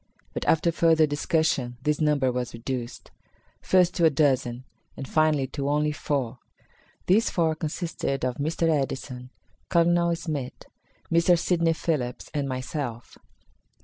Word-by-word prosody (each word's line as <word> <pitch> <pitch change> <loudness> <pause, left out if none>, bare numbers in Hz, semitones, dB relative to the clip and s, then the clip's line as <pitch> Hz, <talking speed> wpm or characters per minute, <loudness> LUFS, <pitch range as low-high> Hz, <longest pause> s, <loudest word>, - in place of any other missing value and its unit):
But, - - -4
after 160 +1 +3
further 165 -1 +4
discussion, 145 -4 0
this 150 +1 0
number 145 -4 +2
was 125 -1 -3
reduced; 120 0 -6 0.5
first 180 -1 +3
to 170 - +2
a - - +7
dozen, 130 -4 +1 0.3
and 135 - -6
finally, 155 -3 +2
to 140 0 -3
only 150 +1 +1
four. 135 -4 -2 0.7
These 210 +5 +3
four 165 -2 +1
consisted 155 -4 -3
of 125 -1 -2
Mr. 160 +3 0
Edison, 135 -4 -2 0.4
Colonel 170 0 +3
Smith, 150 -6 -5 0.5
Mr. 170 +1 +4
Sidney 170 -1 +1
Phillips 140 -7 -3
and 145 -2 -1
myself. 130 -2 -5
150 Hz, 130 wpm, -26 LUFS, 130-165 Hz, 0.7 s, a